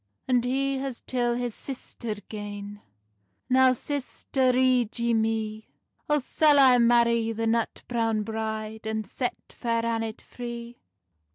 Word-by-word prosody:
And 250 -2 +3
he 270 +2 0
has 265 -3 -5
till 240 -2 0
his 245 -1 -2
sister 240 -4 -6
gane: 205 -1 -7 0.7
"Now, 260 0 +6
sister, 265 -1 -1
rede 250 -3 +2
ye 235 0 +1
mee; 220 -1 -1 0.4
O 295 - +4
sall 295 +2 +3
I 260 -3 +7
marrie 235 -1 +4
the 225 +1 -1
nut 230 0 0
browne 225 -3 0
bride, 220 0 -4
And 220 0 -2
set 245 +5 -2 0.2
Fair 230 -1 -1
Annet 225 -1 -2
free?" 235 -1 -8
235 Hz, 130 wpm, -27 LUFS, 220-255 Hz, 0.7 s, I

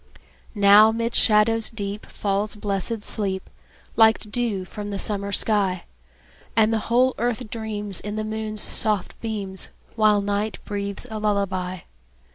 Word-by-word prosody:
Now 205 +2 +7
'mid 230 +1 -2
shadows 225 +1 +4
deep 205 -2 -6
Falls 205 +1 -1
blessed 205 +1 -2
sleep, 195 -3 -1 0.5
Like 220 0 +6
dew 215 -3 -2
from 205 +2 -7
the 200 - -3
summer 200 0 0
sky; 200 -4 +1 0.7
And 220 0 +3
the 225 - +1
whole 255 +2 +3
earth 240 0 -2
dreams, 210 -4 -3
In 210 +1 -5
the 215 - -2
moon's 215 0 -2
soft 210 -4 +1
beams, 200 -4 -3 0.3
While 215 -2 +3
night 205 +1 -2
breathes 200 +1 -5
a 215 - -4
lullaby. 190 -4 -1
210 Hz, 135 wpm, -23 LUFS, 200-220 Hz, 0.7 s, Now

